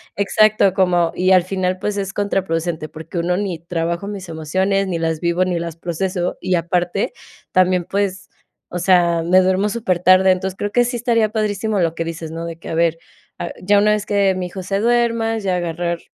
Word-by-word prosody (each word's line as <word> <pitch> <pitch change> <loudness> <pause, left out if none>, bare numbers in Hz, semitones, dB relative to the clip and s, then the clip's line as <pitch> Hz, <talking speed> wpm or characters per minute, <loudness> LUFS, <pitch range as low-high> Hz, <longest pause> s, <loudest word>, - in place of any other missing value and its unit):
Exacto, 200 0 +3
como 180 -3 +2
y 185 +1 +2
al 185 -2 +6
final, 185 0 -1
pues 210 +1 -2
es 195 -1 -3
contraproducente 175 -6 -1
porque 160 +2 -6
1, 175 +1 0
ni 190 -5 -3
trabajo 170 +2 -3
mis 195 -3 -7
emociones, 190 +5 0
ni 175 - -2
las 160 -1 -1
vivo, 170 +2 +1
ni 180 -2 -1
las 170 -1 -5
proceso, 175 +2 -3
y 185 0 +1
aparte 175 +3 -1 0.4
también, 185 -1 +3
pues, 195 +1 -2 0.4
o 180 - -4
sea, 175 -2 +3
me 180 +3 +5
duermo 190 +2 +1
súper 200 -6 -1
tarde. 185 +1 +5
Entonces, 185 +1 -2
creo 205 - -3
que 245 +2 +3
sí 245 +1 -3
estaría 230 -2 +1
padrísimo 215 -1 -1
lo 165 -1 +1
que 165 - -3
dices, 165 -1 -6
¿no?, 165 +1 -5
de 165 -1 -6
que 165 - -10
a - - -3
ver, 165 0 +2 0.4
a 175 - -4
ya 205 +2 +3
una 210 +1 +3
vez 210 -1 0
que 200 -2 +2
mi 185 -1 -3
hijo 185 +1 -7
se 195 +2 -1
duerma, 230 -1 +1
ya 190 -3 -1
agarrar 170 0 -2
185 Hz, 205 wpm, -19 LUFS, 170-200 Hz, 0.4 s, al